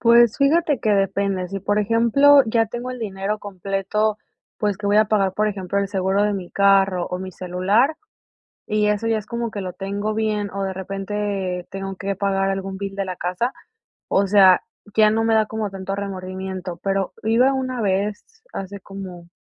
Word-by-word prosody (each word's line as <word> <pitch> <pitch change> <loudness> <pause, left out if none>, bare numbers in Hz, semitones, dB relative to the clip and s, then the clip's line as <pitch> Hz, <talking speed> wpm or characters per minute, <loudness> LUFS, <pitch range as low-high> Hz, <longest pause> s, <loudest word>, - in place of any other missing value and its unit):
Pues, 235 -1 +5
fíjate 290 0 +3
que 215 - +1
depende. 195 -2 0
Sí, 195 - -4
por 205 +2 0
ejemplo, 235 +7 +5
ya 225 0 +2
tengo 240 +3 -5
el 250 - -6
dinero 200 -1 -3
completo, 200 +2 -2 0.4
pues, 205 -2 0
que 205 +1 -5
voy 205 - +3
a 215 - +6
pagar. 200 -3 +2
Por 215 +2 +1
ejemplo, 195 -1 -2
el 200 0 0
seguro 190 +1 +1
de 210 - +2
mi 190 -3 -5
carro 195 -2 +3
o 180 - -4
mi 185 0 -6
celular, 190 - +1 0.7
y 210 0 +1
eso 210 +2 0
ya 225 -1 +2
es 210 - -6
como 235 0 -3
que 205 - -5
lo 185 -1 -5
tengo 200 +2 -3
bien, 215 -2 -1
o 195 0 -3
de 190 -1 -2
repente 195 -1 -3
tengo 195 0 -5
que 195 +1 -3
pagar 195 0 0
algún 195 0 -3
bill 195 0 -5
de 195 -1 -2
la 185 - -4
casa, 180 +9 -2 0.6
o 200 - +2
sea, 190 -2 +6 0.3
ya 215 -1 +6
no 225 +1 +1
me 225 - +3
da 220 0 +4
como 220 -1 -3
tanto 195 0 -5
remordimiento. 185 -2 -5
Pero 195 -1 -1
iba 235 +5 +3
una 255 -2 -2
vez, 200 +1 -1 0.3
hace 195 +1 -6
como 185 -3 -9
200 Hz, 190 wpm, -22 LUFS, 190-215 Hz, 0.7 s, a